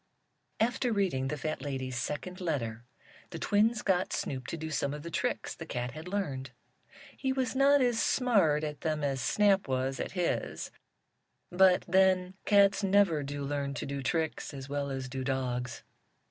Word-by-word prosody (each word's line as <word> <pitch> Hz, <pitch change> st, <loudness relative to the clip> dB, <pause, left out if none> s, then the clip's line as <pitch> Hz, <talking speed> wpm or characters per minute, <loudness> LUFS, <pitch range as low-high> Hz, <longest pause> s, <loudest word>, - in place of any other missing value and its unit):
After 245 Hz, +2 st, +1 dB
reading 185 Hz, -11 st, 0 dB
the 150 Hz, +2 st, -3 dB
fat 155 Hz, +2 st, -3 dB
lady's 130 Hz, -3 st, -4 dB
second 150 Hz, +9 st, -4 dB
letter 120 Hz, -9 st, -2 dB, 0.4 s
the 170 Hz, -, -6 dB
twins 215 Hz, +6 st, +2 dB
got 185 Hz, -2 st, +1 dB
Snoop 130 Hz, -2 st, -3 dB
to 165 Hz, -, -4 dB
do 160 Hz, 0 st, -5 dB
some 140 Hz, 0 st, -1 dB
of 150 Hz, -, -8 dB
the 170 Hz, -, -7 dB
tricks -, -, -1 dB
the -, -, -9 dB
cat 125 Hz, 0 st, -3 dB
had 155 Hz, +3 st, -9 dB
learned. 145 Hz, -10 st, -3 dB, 0.7 s
He 265 Hz, -, -1 dB
was 265 Hz, -2 st, -1 dB
not 280 Hz, +1 st, +5 dB
as 240 Hz, -2 st, +2 dB
smart 195 Hz, -, +3 dB
at 150 Hz, -1 st, -4 dB
them 155 Hz, -2 st, -1 dB
as 135 Hz, -2 st, 0 dB
Snap 200 Hz, -, +3 dB
was 130 Hz, 0 st, -1 dB
at -, -, -4 dB
his, 180 Hz, -3 st, -2 dB, 0.8 s
but 185 Hz, 0 st, +5 dB
then 185 Hz, 0 st, +3 dB
cats 200 Hz, 0 st, +5 dB
never 195 Hz, -5 st, +4 dB
do 145 Hz, 0 st, -4 dB
learn 140 Hz, 0 st, -2 dB
to -, -, -4 dB
do 140 Hz, 0 st, -4 dB
tricks 160 Hz, +1 st, -2 dB
as 135 Hz, 0 st, -7 dB
well 140 Hz, 0 st, -2 dB
as 135 Hz, -1 st, -4 dB
do 130 Hz, 0 st, -4 dB
dogs. 125 Hz, -2 st, -2 dB
155 Hz, 175 wpm, -30 LUFS, 135-195 Hz, 0.8 s, not